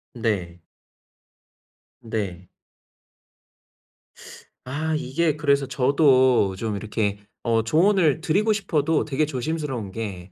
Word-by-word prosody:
네. 95 -7 -2 1.4
네. 100 -6 -5 2.2
아 155 +4 -2
이게 150 +3 -1
그래서 140 -2 +2
저도 130 -6 +3
좀 110 +2 -3
이렇게 105 0 -2 0.2
어 115 -1 +1
조언을 160 - +3
드리고 200 +7 +1
싶어도 160 -7 0
되게 150 +1 0
조심스러운 135 -6 -3
게 95 -4 -6
130 Hz, 185 characters per minute, -23 LUFS, 110-155 Hz, 2.2 s, 저도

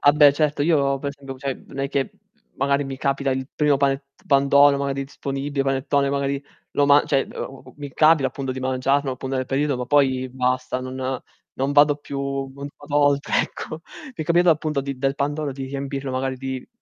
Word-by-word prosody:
Ah 145 - +6
beh 145 -1 +7
certo, 150 -1 0
io 140 -3 +2
per 140 - -3
esempio, 135 -2 -8
cioè, 135 -1 -2
non 135 - -10
è 135 0 -1
che 135 -1 -1 0.5
magari 140 +1 +1
mi 135 -1 -6
capita 140 0 0
il 130 +1 -2
primo 145 -2 +3
panet 140 0 +1 0.2
pandoro 140 0 +5
magari 140 0 -2
disponibile, 140 0 -3
panettone, 135 +1 +1
magari, 140 0 -1 0.3
lo 145 - +3
ma 145 +1 +6
cioè, 135 - +1 0.5
mi 145 -1 -7
capita 155 -4 +5
appunto 135 +1 -4
di 130 - -6
mangiarlo 130 +1 +1
appunto, 130 +1 -4
nel 130 0 -2
periodo, 140 0 0
ma 125 - -4
poi 130 -2 +2
basta, 125 0 -1
non 130 0 -3 0.4
non 135 +2 0
vado 145 0 +5
più 140 -1 -7 0.6
a 145 - -14
volte 145 -1 +2
ecco. 155 - -6 0.2
Mi 265 - -11
è - - -2
capitato 175 +2 +4
appunto 150 -2 0
di 140 -1 -5
del 135 0 0
pandoro, 145 +1 -2
di 135 0 -6
riempirlo 135 0 -4
magari 130 0 -2
di 130 0 -5
140 Hz, 190 wpm, -23 LUFS, 135-145 Hz, 0.6 s, beh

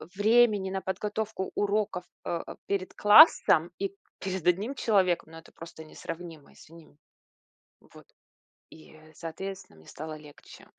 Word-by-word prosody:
времени 210 -2 +3
на 190 0 -3
подготовку 205 +1 -4
уроков, 205 -3 -1 0.2
э, 170 - -2 0.3
перед 195 -2 -2
классом, 205 - +6
и 195 0 -3 0.3
перед 190 -3 -4
1 200 +10 +1
человеком. 185 -9 +1
Ну, 165 - -11
это 165 - -18
просто 165 -1 -11
несравнимо, 160 -1 -9
извини. 165 -2 -17 0.8
Вот. - - -18 0.6
И, 155 - -16
э, 155 0 -18
соответственно, 180 - -8
мне 80 - -20
стало 155 +1 -8
легче. 150 -1 -15
185 Hz, 130 wpm, -28 LUFS, 160-205 Hz, 0.8 s, классом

